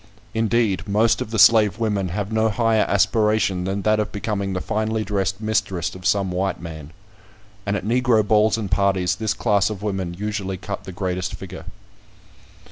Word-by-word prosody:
Indeed 110 -3 0
most 110 +2 +2
of - - -4
the 110 - -3
slave 105 -2 +6
women 105 -4 -1
have 100 +4 -3
no 110 0 +2
higher 110 0 +2
aspiration 100 -2 +2
than 95 +1 -2
that 110 0 +2
of 105 - -2
becoming 100 -2 -3
the 90 - -1
finely 110 +2 -1
dressed 95 -1 -1
mistress 110 -5 -1
of 95 +1 -4
some 100 -3 +1
white 95 +2 -1
man. 80 -4 -8 0.8
And 100 - +1
at - - -6
Negro 115 -2 +2
balls 110 0 +3
and 105 -4 -4
parties, 95 -1 +1
this 110 -1 -1
class 105 -3 +2
of 105 -2 -6
women 95 -4 -3
usually 100 -1 -3
cut 100 +2 -6
the 95 - -7
greatest 90 0 -3
figure. - - -9
100 Hz, 175 wpm, -22 LUFS, 95-110 Hz, 0.8 s, slave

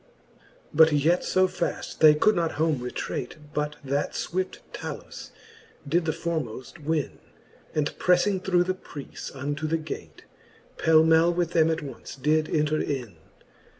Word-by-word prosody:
XXXV. - - -31 0.3
But 160 +1 +7
yet 160 +5 +3
fo 185 0 +3
faft 175 - -4
they 155 -1 +8
could 215 +8 +3
not 170 -2 0
home 155 -2 +1
retrate, 125 0 -4 0.2
But 150 0 -1
that 140 +1 -1
fvvift 185 +1 -2 0.2
Talus - - -7 0.6
did 165 +4 +1
the 160 - +1
formoft 155 -4 -4
win; 155 -1 -1 0.6
And 150 -1 0
preffing 180 +1 +3
through 180 -2 +3
the 185 +1 -1
preace 150 -6 -9
unto 145 +3 -3
the 165 +1 +1
gate, 155 -2 -8 0.6
Pelmell 160 +1 +5
with 175 -1 0
them 160 -2 +4
attonce 150 -3 -5
did 155 +3 +2
enter 155 -1 +1
in. 125 - -3
155 Hz, 145 wpm, -26 LUFS, 145-170 Hz, 0.6 s, they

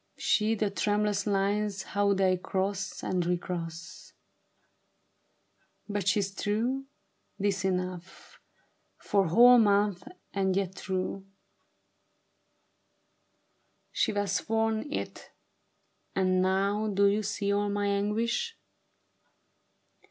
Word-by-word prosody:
See 215 +1 +2
the 210 -2 -1
tremulous 205 0 0
lines 200 0 0
How 200 -1 +1
they 190 -1 +3
cross 190 +1 -3
and 180 -1 0
recross. 170 -1 -5 1.7
But 205 -3 -3
she's 200 0 +1
true; 235 +7 -1 0.5
'tis 195 -2 0
enough, 185 -1 -4 0.6
Four 195 -3 +1
whole 245 +8 +7
months 205 -3 +3 0.3
and 190 -2 +1
yet 190 -1 -2
true. 190 +1 -3 2.6
She - - +1
has 205 -1 0
sworn 225 +4 -1
it, - - -5 0.9
and 185 -1 +2
now 195 +3 +1
Do 200 -1 +2
you 200 +2 +3
see 205 -1 -2
all 205 0 0
my 205 0 -1
anguish 220 - -1
200 Hz, 95 wpm, -29 LUFS, 190-210 Hz, 2.6 s, whole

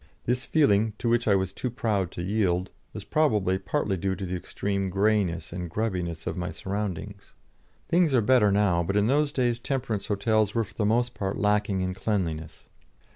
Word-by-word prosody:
This 125 +1 0
feeling, 110 -8 +3
to - - -3
which 120 0 +2
I 100 - +5
was 95 -1 -1
too 125 - -3
proud 110 -7 -1
to 85 - -5
yield, 95 -2 0 0.2
was 105 - -7
probably 105 - +2
partly 95 +1 -1
due 95 +2 -1
to 95 - -5
the 90 0 -3
extreme 100 +2 -2
greyness 100 -3 0
and 90 -1 -5
grubbiness 90 -5 -3
of - - -2
my 90 0 -3
surroundings. 100 0 -5 0.5
Things 170 -5 +3
are 120 - +4
better 110 -2 +4
now, 100 -4 +3
but 100 +4 -1
in 105 - +3
those 145 +4 +2
days 120 -4 0
temperance 120 -5 -2
hotels 105 0 +1
were 115 - +2
for 100 - -13
the 105 - 0
most 120 +3 +1
part 95 -1 -3
lacking 105 -2 +1
in 95 0 -1
cleanliness. 85 -6 -3
100 Hz, 185 wpm, -27 LUFS, 95-115 Hz, 0.5 s, I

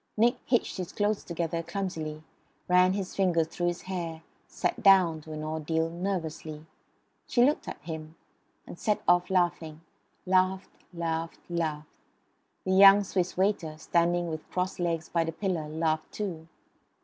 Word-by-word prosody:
Nick 235 +3 +4
hitched 240 -4 +1
his 180 -2 -4
clothes 205 0 0
together 170 -1 -2
clumsily; 160 -5 -4 0.4
ran 180 +1 +5
his 195 -2 -4
fingers 175 -4 +2
through 175 +1 -2
his 175 0 -2
hair; 170 -4 -5 0.2
sat - - -2
down, 185 -5 +5
to 155 - -11
an 155 0 -5
ordeal, 160 +1 -1
nervously. 165 -4 -4 0.6
She 245 -1 +4
looked 295 +3 0
at - - -6
him; 160 0 -7 0.5
and - - -10
set 210 -1 0
off 175 0 +4
laughing; 170 -4 0 0.4
laughed 185 0 +2 0.2
laughed 165 -1 -3
laughed. 155 -3 -2 0.8
The 185 - 0
young 195 +1 +8
Swiss 185 -2 -2
waiter, 185 -5 0
standing 175 +2 +1
with 155 0 -7
crossed 185 +1 -2
legs 170 -2 -1
by 170 -1 +1
the 165 - -3
pillar, 165 -3 -2
laughed 155 0 -1
too. 170 -6 -5
170 Hz, 150 wpm, -28 LUFS, 160-190 Hz, 0.8 s, young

